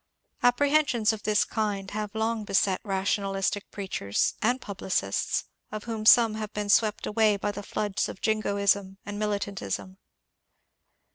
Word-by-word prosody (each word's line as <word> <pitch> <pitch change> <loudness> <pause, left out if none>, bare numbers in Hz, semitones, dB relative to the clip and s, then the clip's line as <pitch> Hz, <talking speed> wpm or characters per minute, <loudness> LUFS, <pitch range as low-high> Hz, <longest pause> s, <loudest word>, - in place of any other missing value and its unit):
Apprehensions 245 -3 +3
of 215 - -6
this 210 0 +2
kind 205 -3 -2
have 210 0 -4
long 220 0 -1
beset 195 -2 +1
rationalistic 195 0 -1
preachers 185 - -1
and 245 +4 +2
publicists, 185 - -1 0.3
of 215 0 -5
whom 220 -2 -3
some 230 -2 +7
have 215 -1 -5
been 210 -1 -3
swept 215 0 +3
away 215 -1 +2
by 205 +1 -2
the 205 0 -6
floods 205 0 -2
of - - -8
Jingoism 200 -2 +1
and 205 0 -5
Militantism. 200 -2 -3
210 Hz, 135 wpm, -27 LUFS, 200-220 Hz, 0.3 s, some